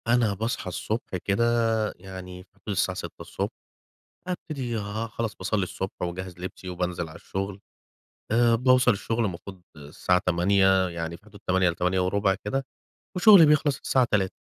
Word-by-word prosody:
أنا 120 -3 +3
باصحى 110 0 -3
الصبح 105 +3 -3
كده 100 +3 +2 0.5
يعني 90 0 -9
في - - -31
حدود 100 +1 -13
الساعة 95 -2 0
6:00، - - -5 0.8
ابتدي 140 -10 -3
آآ، 105 +2 -3
خلاص 115 -1 -4
باصلي 100 +2 -1
الصبح 95 +1 -5
وأجهز 90 0 -5
لبسي 95 +1 -7
وبانزل 90 -1 -3
على 80 - -11
الشغل. 95 +3 -5 0.7
آآ، 115 +1 +4
باوصل 130 +2 +4
الشغل 115 +3 -1
المفروض 95 0 -6
الساعة 75 +5 0
08:00 95 +1 +3
يعني 85 -1 -5
في 105 - -28
حدود 105 -1 -15
08:00 90 0 +3
ل08:15 95 +3 +1
كده، 135 +6 -1 0.5
وشغلي 180 -2 +8
بيخلص 150 -2 +3
الساعة 130 -2 +3
15:00 95 -3 +1
95 Hz, 145 wpm, -26 LUFS, 90-115 Hz, 0.8 s, وشغلي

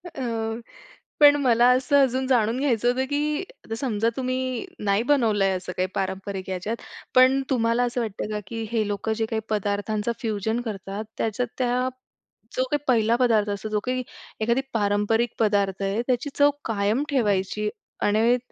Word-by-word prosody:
अ, 270 - -4 1.0
पण 290 -1 +8
मला 240 -1 +5
असं 270 +2 +2
अजून 260 0 0
जाणून 235 -2 +2
घ्यायचं 245 -4 +1
होतं, 255 +2 +2
की 295 +1 0 0.3
आता 225 - -4
समजा 230 -2 0
तुम्ही 255 +3 -2 0.2
नाही 200 +3 +2
बनवलंय, 220 -8 +2
असं 180 0 -7
काही 185 +1 +1
पारंपरिक 190 0 -3
याच्यात. 190 +5 -3 0.4
पण 260 +1 +6
तुम्हाला 235 -1 +2
असं 245 0 -1
वाटतं 215 -2 -4
का? 210 - -2
की 225 +1 -4
हे 220 -3 +1
लोकं 205 +2 -1
जे - - +3
काही 220 0 -2
पदार्थांचा 210 +1 -1
फ्युजन 220 -1 -1
करतात, 205 -2 -5
त्याच्यात 225 +3 -1
त्या 250 0 +1 0.7
जो 255 - +2
का 295 - +3
पहिला 230 -2 +3
पदार्थ 225 -4 +2
असतो, 205 +1 -3
जो 210 0 0
काही 255 0 -1 0.4
एखादी 235 +4 +2
पारंपरिक 210 +2 +1
पदार्थ 200 -3 +1
आहे, 195 +3 0
त्याची 255 +2 0
चव 285 0 +5 0.2
कायम 215 +4 +1
ठेवायची. 210 -4 0 0.3
आणि 225 +4 +3
225 Hz, 160 wpm, -25 LUFS, 205-250 Hz, 1.0 s, पण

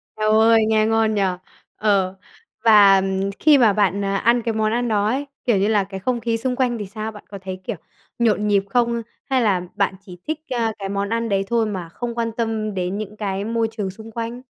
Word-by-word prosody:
Eo 215 0 0
ôi, 225 0 +5
nghe 215 -1 +3
ngon 225 -1 +2
nhỉ! 200 - +1 0.5
Ờ, 195 -3 +1 0.5
và, 205 -3 +7
ừm, 190 +1 -1
khi 300 -2 +6
mà 225 -5 +5
bạn, 200 -1 +1
à, 195 0 0
ăn 235 +3 +3
cái 230 - -1
món 215 0 0
ăn 240 +1 0
đó 210 -2 +1
ấy, 275 +5 -1 0.2
kiểu 235 -5 +3
như 200 +2 +2
là, 210 -3 +2
cái 190 0 -7
không 240 +4 -1
khí 230 0 0
xung 250 +2 -2
quanh 245 -2 0
thì 205 - -5
sao? 215 +3 -5
Bạn 210 - -12
có 200 - -7
thấy, 185 -1 -6
kiểu, - - -4 0.4
nhộn 210 -2 +2
nhịp 200 -1 +3
không 235 0 +1 0.3
hay 260 -2 +2
là 195 -5 +2
bạn 200 -2 0
chỉ 180 -2 -12
thích, 310 0 -2
a, 230 -3 0
cái 195 0 -4
món 200 0 -2
ăn 230 0 -1
đấy 195 -1 +1
thôi 230 0 +1
mà 185 -5 -5
không 235 +6 -5
quan 230 -1 -1
tâm 220 -2 -2
đến 185 +1 -2
những 210 0 -6
cái 200 -1 -3
môi 230 0 0
trường 210 -4 -3
xung 220 +4 -11
quanh? 235 +2 -5
215 Hz, 235 wpm, -21 LUFS, 200-230 Hz, 0.5 s, và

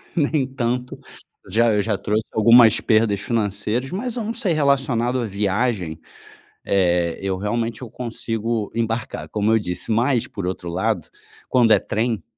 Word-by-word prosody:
nem 145 -4 +1
tanto. 125 0 -2 0.5
Já, 115 +2 +3
eu 105 - +2
já 105 -1 -1
trouxe 105 +2 -1
algumas 115 +1 +6
perdas 110 -2 +2
financeiras, 110 +3 -1
mas 235 +6 -4
eu 230 - -2
não 225 - -3
sei, 210 -6 0
relacionado 130 -4 +1
à - - -2
viagem. 100 -4 -1 0.7
Eh, 90 -3 +1
eu 95 -1 -1
realmente 115 +3 -2
eu 125 - -7
consigo 115 -2 -3
embarcar, 115 +1 -3
como 105 +1 0
eu 110 - +4
disse, 90 +1 -4
mas 120 +2 +1
por 100 -3 -5
outro 90 -1 -4
lado, 95 0 -1 0.4
quando 120 -3 +4
é 100 - +5
trem 115 +2 -2
115 Hz, 155 wpm, -21 LUFS, 100-125 Hz, 0.7 s, algumas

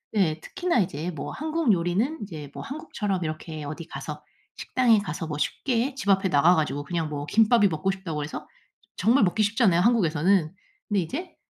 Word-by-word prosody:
예 160 -6 +2
특히나 355 - -1
이제 175 -3 -1
뭐 155 - -6
한국 315 -4 +1
요리는 190 - 0
이제 155 -8 -8
뭐 - - -7
한국처럼 210 - -3
이렇게 155 -1 -5
어디 155 +3 -6
가서 - - -7 0.3
식당에 240 -4 +3
가서 165 -4 -4
뭐 150 - -4
쉽게 245 - -1
집 205 -7 -4
앞에 195 -1 +3
나가 160 +5 +5
가지고 145 -2 -1
그냥 165 -1 -2
뭐 145 -1 -4
김밥이 220 +3 +4
먹고 160 +1 -1
싶다고 170 -6 -4
해서 150 - -7 0.5
정말 230 +6 +3
먹기 200 +3 +2
쉽잖아요 205 -5 +3
한국에서는. 180 -5 +2 0.3
근데 205 -2 +1
이제 315 - -5
185 Hz, 375 characters per minute, -26 LUFS, 155-225 Hz, 0.5 s, 나가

